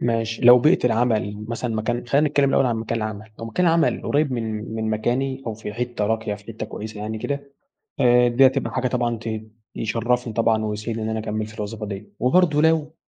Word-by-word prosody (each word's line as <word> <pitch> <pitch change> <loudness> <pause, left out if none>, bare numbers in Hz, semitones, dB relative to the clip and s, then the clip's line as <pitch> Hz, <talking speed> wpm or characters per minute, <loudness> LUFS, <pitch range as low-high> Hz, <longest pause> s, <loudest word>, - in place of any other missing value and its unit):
ماشي 115 -1 -1
لو 125 +1 +9
بيئة 150 0 +3
العمل 110 -3 0
مثلًا 115 0 -3
مكان 120 +2 -2
خلّينا 145 +4 +3
نتكلم 140 -1 +2
الأول 135 -1 +3
عن 115 -2 0
مكان 115 +1 -2
العمل، 110 0 -5
لو 115 - -6
مكان 175 +11 0
العمل 165 0 +2
قريب 145 -2 +1
من 110 -2 -4
من 110 0 -2
مكاني 130 +5 -1
أو 110 - -2
في 105 -1 -7
حتة 120 -2 -2
راقية 110 -1 -1
في 100 0 -14
حتة 110 -1 -6
كويسة 105 0 -7
يعني 110 +1 -4
كده، 140 +2 -4 0.5
آآ 125 -1 +5
دي 125 +3 +5
هتبقى 130 +1 +1
حاجة 130 0 0
طبعًا 120 -2 -1
ت 115 - -7 0.5
يشرّفني 115 +1 -1
طبعًا 110 -1 +2
ويسعدني 110 +2 -3
إني 110 - -2
أنا 110 - -2
أكمل 110 0 -3
في 110 0 -12
الوظيفة 105 +1 -5
دي، 100 +1 -8
وبرضه 150 +3 +3
لو 160 -1 +2
115 Hz, 205 wpm, -23 LUFS, 110-130 Hz, 0.5 s, لو